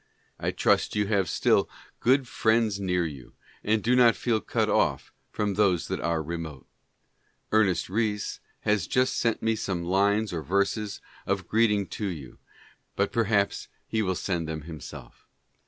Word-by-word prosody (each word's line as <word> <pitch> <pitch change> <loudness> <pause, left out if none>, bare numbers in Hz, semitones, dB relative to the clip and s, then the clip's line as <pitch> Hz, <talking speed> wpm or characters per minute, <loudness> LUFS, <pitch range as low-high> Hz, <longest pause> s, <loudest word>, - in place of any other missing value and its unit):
I - - -1
trust - - +1
you 105 0 +2
have 100 -4 +1
still - - +2 0.3
good 130 +1 +3
friends 110 -3 +1
near 90 -3 0
you. 70 -5 -8 0.3
and 110 0 +1
do 125 +2 +3
not 120 -2 +6
feel 115 -3 0
cut - - 0
off - - +1 0.2
from 105 -1 -1
those 95 -4 +2
that - - -2
are 85 -2 -1
remote. 80 -4 -6 0.9
Ernest 105 -4 +3
Rhys 105 +1 -1 0.2
has 105 -1 +1
just 130 0 +2
sent 115 -2 0
me 115 0 +2
some 95 -5 -3
lines 100 +3 +2
or 80 - -2
verses 100 +5 -1 0.3
of 95 -3 -1
greeting 105 -3 +2
to 105 - -3
you 75 -9 -7 0.3
— - - -31
but 100 +1 0
perhaps 110 -4 +1 0.2
he 110 - -1
will 95 -3 0
send 85 -3 -2
them 80 -1 -4
himself. 80 0 -10
100 Hz, 160 wpm, -27 LUFS, 90-110 Hz, 0.9 s, not